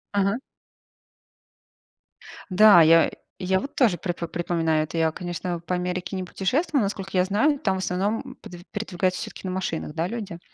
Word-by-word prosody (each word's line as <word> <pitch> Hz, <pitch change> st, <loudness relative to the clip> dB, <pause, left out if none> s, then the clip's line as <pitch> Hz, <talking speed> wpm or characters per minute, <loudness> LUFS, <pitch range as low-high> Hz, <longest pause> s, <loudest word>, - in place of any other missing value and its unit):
Ага. 200 Hz, +3 st, +2 dB, 2.1 s
Да, 200 Hz, -2 st, +8 dB
я 165 Hz, +1 st, +6 dB, 0.3 s
я 190 Hz, 0 st, +1 dB
вот 280 Hz, -, -7 dB
тоже 220 Hz, -10 st, +3 dB
при 175 Hz, -, -3 dB
припоминаю 165 Hz, -2 st, -1 dB
это. 160 Hz, +2 st, -6 dB
Я, 160 Hz, -1 st, +2 dB
конечно, 175 Hz, 0 st, -4 dB
по 170 Hz, +2 st, -3 dB
Америке 180 Hz, +1 st, -3 dB
не 185 Hz, -, -3 dB
путешествовала. 260 Hz, -, 0 dB
Насколько 195 Hz, -1 st, -4 dB
я 180 Hz, -, +4 dB
знаю, 270 Hz, +10 st, +2 dB
там 195 Hz, -3 st, 0 dB
в -, -, -3 dB
основном 195 Hz, +5 st, -2 dB
пед 175 Hz, -1 st, -10 dB
передвигаются 185 Hz, -3 st, -1 dB
всё-таки 190 Hz, -, -7 dB
на 185 Hz, -, -3 dB
машинах, 165 Hz, -5 st, -3 dB
да, 165 Hz, +2 st, -1 dB
люди? 205 Hz, -6 st, -6 dB
185 Hz, 160 wpm, -24 LUFS, 175-200 Hz, 2.1 s, Да